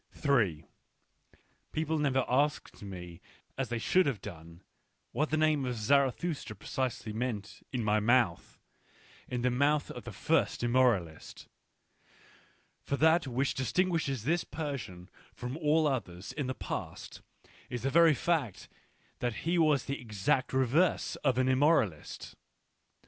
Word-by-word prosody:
People 160 0 -1
have - - -1
never 130 -3 +1
asked 145 +4 0
me 90 -3 -8 0.3
as 135 -2 -3
they 120 - -1
should 180 +9 +3
have 130 -7 -1
done, 85 -2 -11 0.5
what 150 +1 0
the 155 - +1
name 155 -2 +2
of 125 -1 -2
Zarathustra 140 +3 0
precisely 120 0 -3
meant 110 -3 -4
in 125 -3 -2
my 105 0 +2
mouth, 115 -5 +1 0.7
in 125 -1 -3
the 125 - +2
mouth 145 +4 +1
of - - -8
the - - -7
first - - 0
immoralist; 120 -10 +1 1.4
for 140 - -2
that 160 0 +4
which 130 +2 0
distinguishes 140 - 0
this 165 +6 +1
Persian 130 - -6 0.3
from 125 +2 -5
all 155 0 +2
others 100 -10 -3
in 145 -4 -3
the 130 - -3
past - - -6 0.5
is 120 -2 -5
the 135 - 0
very 165 -1 +6
fact 140 - -1 0.5
that 120 -3 -1
he 170 +1 +2
was 150 -5 +3
the 140 -1 -4
exact 120 +5 0
reverse 135 +7 +2
of 130 -4 0
an 130 0 +2
immoralist. 130 - +1
130 Hz, 135 wpm, -31 LUFS, 110-150 Hz, 1.4 s, very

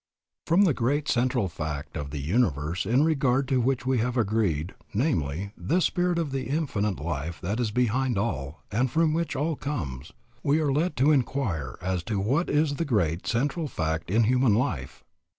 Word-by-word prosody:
From 175 +5 +5
the 175 -7 +4
great 140 +5 0
central 125 -5 +1
fact 75 -3 -5
of 70 -1 -4
the 75 - -5
universe 80 - 0
in 125 +6 +4
regard 135 -4 +2
to 130 -2 +2
which 130 +1 0
we 130 -2 +2
have 125 +2 -1
agreed, 100 -7 0 0.2
namely, 100 - 0
this 175 +3 +1
Spirit 180 -1 +1
of 155 -5 -1
Infinite 130 - -1
Life 80 +2 -4
that 100 +7 -2
is 120 -3 +1
behind 125 +1 +1
all 75 - -3
and 125 +5 +1
from 160 +3 +2
which 165 +1 -1
all 155 +3 0
comes, 75 - -4 0.3
we 145 +4 +2
are 150 -3 +1
led 165 +6 0
to 140 +4 +4
inquire 115 - 0
as 90 -1 -1
to 105 -3 -1
what 135 - +1
is 150 -1 +1
the - - 0
great 95 - 0
central 145 +7 0
fact 80 - -2
in 110 +5 +3
human 125 -1 +3
life. 90 - -2
120 Hz, 180 wpm, -27 LUFS, 85-140 Hz, 0.3 s, From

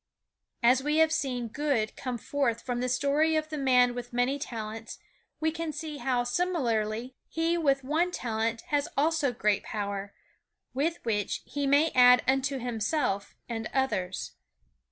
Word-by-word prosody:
As 250 +2 +5
we 300 +2 0
have 320 0 +5
seen 255 -6 -1
good 240 -3 -1
come 255 -2 -4
forth 235 -1 -1
from 245 -1 -2
the 250 +1 -1
story 285 +5 +2
of 310 0 -1
the 310 - -4
man 250 -2 +4
with 245 0 -6
many 250 +3 +1
talents, 225 -4 -6 0.4
we 320 0 +1
can 330 0 -3
see 305 -1 -6
how, 250 -3 0
similarly, 245 -6 -1 0.2
he 330 +1 0
with 275 -5 +2
one 315 +6 +1
talent 230 -7 -2
has 290 -1 +1
also 305 -1 +2
great 210 -3 +1
power 200 -1 -4 0.6
with 315 +6 0
which 210 -3 -1
he 285 -1 -2
may 290 +4 +4
add 250 0 +7
unto 270 +1 +1
himself 240 -3 -1
and 225 -2 -4
others. 190 -9 -1
255 Hz, 155 wpm, -28 LUFS, 230-300 Hz, 0.6 s, add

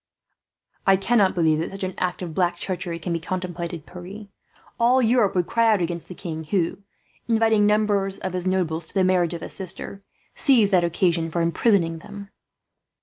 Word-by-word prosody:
"I 195 - +7
cannot 200 0 +2
believe 160 -3 +2
that 165 - -2
such 195 0 -7
an 185 0 -2
act 180 0 -2
of 170 -3 -6
black 175 0 +1
treachery 180 -2 -4
can 170 +1 -4
be 165 - -1
contemplated, 175 -2 -5
Pierre. 190 +4 -10 0.5
All 245 +2 +4
Europe 235 -4 +3
would 180 -1 +2
cry 230 +4 +2
out 210 - +3
against 170 -1 -3
the 180 - -9
king 160 -3 -6
who, 170 +2 -1 0.5
inviting 225 -2 +3
numbers 205 -2 +1
of 185 -1 -5
his 180 0 -2
nobles 175 -3 -1
to - - -6
the 190 - +3
marriage 180 -2 +2
of 165 - -7
his - - -7
sister, 190 +1 -7 0.3
seized 235 -8 +3
that 180 -2 +4
occasion 170 -1 +1
for 170 - -2
imprisoning 170 0 +1
them." 200 +3 -10
185 Hz, 185 wpm, -23 LUFS, 170-205 Hz, 0.5 s, I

